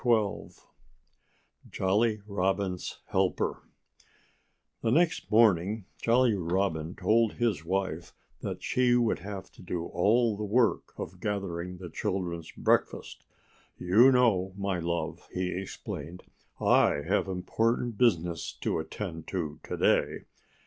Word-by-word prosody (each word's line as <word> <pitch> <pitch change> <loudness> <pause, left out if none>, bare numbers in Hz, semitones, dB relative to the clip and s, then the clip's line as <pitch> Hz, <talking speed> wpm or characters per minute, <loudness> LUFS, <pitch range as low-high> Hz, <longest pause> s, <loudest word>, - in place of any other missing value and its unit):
*XII* 110 -5 +1 1.2
*JOLLY 105 +3 +1
ROBIN'S 95 -2 -2
HELPER* - - 0 1.2
The - - 0
next 165 +7 +2
morning 105 -2 +3 0.2
Jolly 120 0 +4
Robin 90 -3 -1
told 115 0 +2
his 115 -8 0
wife 85 -3 -2 0.3
that - - -5
she 125 -1 +3
would 120 -2 +2
have 100 -1 -7
to - - -16
do 90 -2 -4
all 110 +6 +2
the 105 - -5
work 115 +3 +1
of 90 +2 -7
gathering 90 -3 -3
the 90 -2 -9
children's 85 -1 -3
breakfast. - - 0 0.5
"You 110 +9 +5
know, 100 -7 +2
my 100 -2 -1
love," 85 0 -3
he 90 0 -1
explained, 90 -2 -6 0.4
"I 75 - +4
have - - +1
important 110 +5 -1
business 85 -9 +1
to - - -2
attend 80 0 -6
to 80 -6 -3
to - - -5
day." - - +2
95 Hz, 120 wpm, -29 LUFS, 90-110 Hz, 1.2 s, You